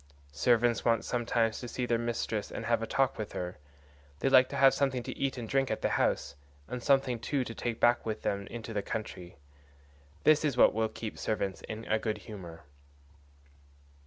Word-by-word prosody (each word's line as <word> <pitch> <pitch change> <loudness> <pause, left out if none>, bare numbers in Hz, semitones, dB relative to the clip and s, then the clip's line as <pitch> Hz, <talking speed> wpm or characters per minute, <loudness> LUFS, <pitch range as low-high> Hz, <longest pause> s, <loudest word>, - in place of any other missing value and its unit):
Servants 120 - +3
want 115 -1 +2
sometimes 115 -2 0
to 120 - -6
see 125 +1 -3
their 120 -1 +1
mistress 115 -3 -2
and 115 - -5
have 115 0 +1
a 115 - -3
talk 135 -3 +1
with 105 - -5
her; 90 -2 -5 0.6
they 135 - +1
like 130 -1 +6
to - - -5
have 135 -1 +6
something 135 -3 0
to 130 +1 -6
eat 135 -1 -1
and 120 -2 -5
drink 135 +1 +1
at - - -3
the - - +2
house, 70 +1 0 0.3
and 125 - -5
something 135 -3 +2
too 135 +3 -1
to 115 - -6
take 115 0 -3
back 120 0 +4
with 110 -1 -4
them 100 0 -1
into 115 -1 -7
the 105 - 0
country. 90 -5 -6 0.9
This 155 0 +5
is 140 -5 0
what - - +6
will 110 0 0
keep 110 -1 -7
servants 100 -3 -2
in 110 +1 -7
a 110 - +1
good 110 -1 -2
humour." 90 -6 -10
115 Hz, 195 wpm, -30 LUFS, 110-125 Hz, 0.9 s, like